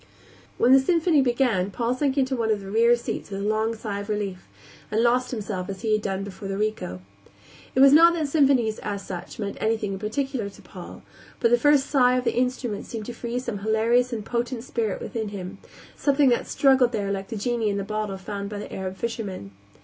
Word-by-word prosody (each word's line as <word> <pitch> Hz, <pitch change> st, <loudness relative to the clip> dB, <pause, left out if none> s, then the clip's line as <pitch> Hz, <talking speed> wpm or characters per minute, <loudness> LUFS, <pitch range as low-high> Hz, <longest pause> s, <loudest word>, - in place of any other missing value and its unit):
When 250 Hz, -, +5 dB
the 270 Hz, -, +8 dB
symphony 325 Hz, +1 st, +3 dB
began 240 Hz, -7 st, +1 dB
Paul 235 Hz, +4 st, -1 dB
sank 270 Hz, +1 st, -1 dB
into 265 Hz, -1 st, +1 dB
one 230 Hz, -2 st, -1 dB
of 210 Hz, -2 st, +1 dB
the 195 Hz, 0 st, -8 dB
rear 235 Hz, +2 st, +5 dB
seats 235 Hz, -, -5 dB
with 195 Hz, -1 st, -5 dB
a -, -, -3 dB
long 220 Hz, +1 st, 0 dB
sigh 210 Hz, -2 st, -4 dB
of 205 Hz, +1 st, -7 dB
relief, 200 Hz, -3 st, -3 dB, 0.4 s
and 220 Hz, +2 st, +1 dB
lost 250 Hz, +1 st, +2 dB
himself 205 Hz, -6 st, -4 dB
as 195 Hz, -1 st, -6 dB
he 220 Hz, -2 st, +1 dB
had 215 Hz, -, +2 dB
done 195 Hz, -1 st, -2 dB
before 200 Hz, 0 st, -8 dB
the 195 Hz, 0 st, -3 dB
Rico. 210 Hz, -, -3 dB, 0.7 s
It 260 Hz, -, +4 dB
was 275 Hz, 0 st, +8 dB
not 335 Hz, +3 st, +8 dB
that 315 Hz, -3 st, -1 dB
symphonies, 270 Hz, -7 st, +2 dB
as 200 Hz, -1 st, -5 dB
such, 180 Hz, -1 st, -7 dB
meant 200 Hz, -2 st, -4 dB
anything 220 Hz, -2 st, 0 dB
in 190 Hz, -, -5 dB
particular 230 Hz, +1 st, -2 dB
to 195 Hz, -, -16 dB
Paul, -, -, -11 dB, 0.4 s
but 230 Hz, -, +2 dB
the 240 Hz, -, +5 dB
first 290 Hz, +1 st, +4 dB
sigh 255 Hz, -3 st, +3 dB
of 250 Hz, -, -1 dB
the -, -, 0 dB
instruments 245 Hz, -3 st, -2 dB
seemed 220 Hz, -2 st, -5 dB
to 240 Hz, -, -6 dB
free 235 Hz, +1 st, -4 dB
some 240 Hz, -5 st, -4 dB
hilarious 225 Hz, +4 st, +2 dB
and 220 Hz, -3 st, -4 dB
potent 240 Hz, 0 st, -2 dB
spirit 225 Hz, -6 st, -2 dB
within 220 Hz, -2 st, -4 dB
him; 195 Hz, -1 st, -7 dB, 0.4 s
something 280 Hz, -1 st, +3 dB
that 240 Hz, -, +1 dB
struggled 265 Hz, -3 st, +3 dB
there 200 Hz, -2 st, -1 dB
like 195 Hz, -1 st, -3 dB
the 230 Hz, -, -6 dB
genie 230 Hz, 0 st, 0 dB
in 200 Hz, -, -1 dB
the 200 Hz, -, -2 dB
bottle 215 Hz, -1 st, -3 dB
found 200 Hz, +1 st, -5 dB
by 210 Hz, -, -6 dB
the 205 Hz, -, -7 dB
Arab 190 Hz, 0 st, -5 dB
fisherman. 200 Hz, -, -5 dB
225 Hz, 220 wpm, -25 LUFS, 200-250 Hz, 0.7 s, the